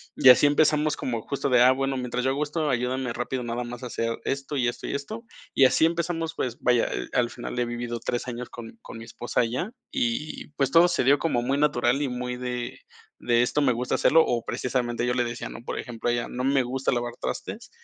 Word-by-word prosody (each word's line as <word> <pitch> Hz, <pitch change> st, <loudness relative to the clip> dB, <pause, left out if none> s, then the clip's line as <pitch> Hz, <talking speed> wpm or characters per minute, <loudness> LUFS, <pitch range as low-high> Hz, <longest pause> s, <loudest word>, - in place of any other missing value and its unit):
Y 130 Hz, -, +6 dB
así 125 Hz, +3 st, +8 dB
empezamos 150 Hz, +1 st, +3 dB
como 115 Hz, -3 st, -3 dB
justo 140 Hz, +3 st, -2 dB
de: 125 Hz, -2 st, +5 dB
"Ah, 125 Hz, +1 st, +7 dB
bueno, 135 Hz, 0 st, -1 dB
mientras 125 Hz, -1 st, -2 dB
yo 130 Hz, -, +3 dB
hago 140 Hz, +2 st, -2 dB
esto 150 Hz, 0 st, -1 dB
ayúdame 125 Hz, 0 st, -1 dB
rápido 125 Hz, +1 st, -3 dB
nada 120 Hz, +1 st, -3 dB
más 120 Hz, +1 st, -8 dB
a -, -, -3 dB
hacer 115 Hz, -1 st, -2 dB
esto, 135 Hz, +1 st, -2 dB
y 125 Hz, -2 st, +2 dB
esto, 120 Hz, -, -4 dB
y -, -, -2 dB
esto". 215 Hz, +12 st, -5 dB, 0.3 s
Y 135 Hz, -, +6 dB
así 130 Hz, +5 st, +4 dB
empezamos, 165 Hz, -1 st, -1 dB
pues, 120 Hz, -2 st, -3 dB
vaya, 125 Hz, -2 st, +3 dB, 0.2 s
al 125 Hz, -2 st, +2 dB
final 120 Hz, 0 st, -7 dB
he 120 Hz, -, +2 dB
vivido 120 Hz, 0 st, -4 dB
3 120 Hz, +2 st, -3 dB
años 125 Hz, 0 st, -5 dB
con 115 Hz, -1 st, -10 dB
con -, -, -10 dB
mi 115 Hz, -, -8 dB
esposa 120 Hz, +1 st, -1 dB
ya, 125 Hz, -, -3 dB, 0.2 s
y, 240 Hz, -, -2 dB
pues, 135 Hz, -2 st, +1 dB
todo 165 Hz, +3 st, +7 dB
se 175 Hz, -5 st, +1 dB
dio 140 Hz, +3 st, +4 dB
como 140 Hz, -7 st, 0 dB
muy 135 Hz, +3 st, 0 dB
natural 130 Hz, -2 st, +2 dB
y 145 Hz, -, 0 dB
muy 125 Hz, 0 st, -4 dB
de 125 Hz, -1 st, -4 dB, 0.4 s
de 120 Hz, -1 st, +3 dB
esto 125 Hz, -, 0 dB
me 130 Hz, -3 st, +3 dB
gusta 125 Hz, +2 st, -1 dB
hacerlo, 160 Hz, +1 st, +5 dB
o, 120 Hz, -2 st, -1 dB
precisamente, 120 Hz, -2 st, -1 dB
yo 125 Hz, -, +1 dB
le 125 Hz, -1 st, +1 dB
decía, 120 Hz, 0 st, -5 dB
¿no? -, -, -9 dB
Por -, -, -4 dB
ejemplo, 120 Hz, -1 st, -3 dB
a -, -, +2 dB
ella: 120 Hz, 0 st, -1 dB
"No 125 Hz, -, -4 dB
me 135 Hz, -1 st, +3 dB
gusta 130 Hz, +2 st, -1 dB
lavar 120 Hz, -1 st, -2 dB
trastes", -, -, -5 dB
125 Hz, 235 wpm, -26 LUFS, 120-140 Hz, 0.4 s, así